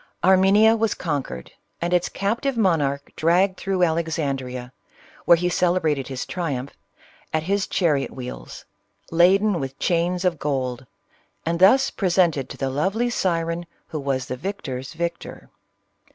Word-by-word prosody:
Armenia 195 Hz, +4 st, +5 dB
was 225 Hz, -1 st, 0 dB
conquered, 140 Hz, -, -4 dB, 0.3 s
and 175 Hz, +1 st, -1 dB
its 175 Hz, -1 st, +2 dB
captive 235 Hz, +6 st, -1 dB
mon 185 Hz, -8 st, +3 dB
arch 140 Hz, 0 st, -1 dB
dragged 180 Hz, +4 st, +2 dB
through 190 Hz, -2 st, 0 dB
Alexandrea, 140 Hz, -7 st, -2 dB, 0.5 s
where 170 Hz, -, +7 dB
he 175 Hz, +1 st, 0 dB
celebra 175 Hz, -3 st, +2 dB
ted 135 Hz, -3 st, -5 dB
his 130 Hz, -2 st, -4 dB
triumph, 140 Hz, -7 st, -4 dB, 0.6 s
at 155 Hz, 0 st, 0 dB
his 200 Hz, +3 st, 0 dB
chariot 150 Hz, -7 st, +1 dB
wheels, 125 Hz, -, -8 dB, 0.5 s
laden 185 Hz, +3 st, +4 dB
with 135 Hz, -1 st, -5 dB
chains 175 Hz, +1 st, 0 dB
of 175 Hz, -4 st, +1 dB
gold, 130 Hz, -3 st, -2 dB, 0.6 s
and 170 Hz, +1 st, -1 dB
thus 265 Hz, +9 st, +5 dB
presented 175 Hz, -7 st, +1 dB
to -, -, -8 dB
the 135 Hz, -1 st, -2 dB
lovely 195 Hz, -, 0 dB
siren 170 Hz, -4 st, -1 dB, 0.2 s
who 155 Hz, -, -4 dB
was 135 Hz, -2 st, -2 dB
the 130 Hz, -, -4 dB
victor's 135 Hz, -6 st, -5 dB
victor. 170 Hz, +1 st, -5 dB
170 Hz, 140 wpm, -23 LUFS, 140-185 Hz, 0.6 s, where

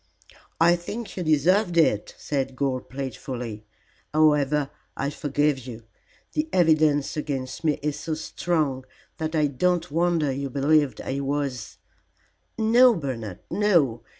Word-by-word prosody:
"I 170 Hz, +2 st, +5 dB
think 210 Hz, +6 st, -6 dB
you 185 Hz, -, -3 dB
deserved 175 Hz, +4 st, +2 dB
it," 105 Hz, -11 st, +2 dB
said 135 Hz, -2 st, -3 dB
Gore, 130 Hz, -1 st, -1 dB
playfully. 125 Hz, -5 st, -6 dB, 0.5 s
"However, 150 Hz, -2 st, +3 dB, 0.3 s
I 140 Hz, +1 st, -1 dB
forgive 145 Hz, -1 st, 0 dB
you. 120 Hz, -2 st, -9 dB, 0.5 s
The 305 Hz, +1 st, -1 dB
evidence 155 Hz, -4 st, +3 dB
against 135 Hz, -2 st, -4 dB
me 155 Hz, -2 st, +2 dB
is 150 Hz, 0 st, -2 dB
so 160 Hz, 0 st, -3 dB
strong 155 Hz, -4 st, -1 dB, 0.4 s
that 160 Hz, 0 st, -2 dB
I 155 Hz, -1 st, +3 dB
don't 170 Hz, +4 st, 0 dB
wonder 165 Hz, -2 st, +1 dB
you 140 Hz, +1 st, -3 dB
believed 145 Hz, +1 st, +2 dB
I 135 Hz, +1 st, -3 dB
was 140 Hz, -5 st, -3 dB, 0.4 s
" -, -, -41 dB
"No, 235 Hz, +2 st, +5 dB
Bernard, 115 Hz, -, -5 dB
no. 165 Hz, -, +2 dB
150 Hz, 130 wpm, -25 LUFS, 135-165 Hz, 0.5 s, I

